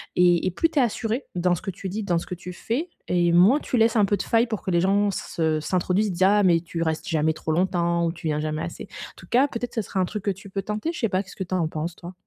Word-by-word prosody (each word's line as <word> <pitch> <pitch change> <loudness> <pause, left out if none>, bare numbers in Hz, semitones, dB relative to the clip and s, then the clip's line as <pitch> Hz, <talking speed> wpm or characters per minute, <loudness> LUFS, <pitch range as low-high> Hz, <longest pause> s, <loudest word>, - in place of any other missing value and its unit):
et 175 -1 +4
et - - 0
plus 330 - +1
tu 305 - 0
es - - +6
assuré 235 +1 -1
dans 180 0 +2
ce - - -7
que 200 - -4
tu 190 +1 -7
dis, 210 +4 -3
dans 175 -4 +1
ce 165 - -3
que 180 - -5
tu 180 +1 -8
fais 240 - -3 0.2
et 175 -1 +2
moins 190 - +6
tu 255 - -2
laisses 225 0 +3
un 210 -3 +5
peu 205 +1 +1
de 190 - -3
failles 230 +1 +2
pour 220 -3 -4
que 190 - -2
les 170 -1 +3
gens 200 +2 +3
s 195 - -3
se 160 -2 +1
s'introduisent, 185 +5 0
disent: 180 +1 0
«Ah 205 +2 +5
mais 175 -3 +5
tu 170 0 -5
restes 160 +3 -1
jamais 160 -3 +1
trop 160 0 -4
longtemps» 170 0 +1
ou - - 0
«Tu 165 -1 -6
viens 150 -1 0
jamais 155 +1 -2
assez». - - -7 0.2
En - - -26
tout - - -13
cas, 260 +4 +4
peut-être, 245 -2 -5
ce 225 - +1
serait 195 - -3
un 185 - +3
truc 210 +2 -5
que 200 - +1
tu 195 +1 -10
peux 195 +1 -3
tenter, 210 +9 -2
je 340 - -7
sais 225 - +1
pas, 185 0 +1
qu'est-ce 195 - -13
que 190 - -3
tu 180 - -6
en 170 -3 +1
penses 160 +2 -4
toi? 175 +1 -10
185 Hz, 320 wpm, -24 LUFS, 170-210 Hz, 0.2 s, es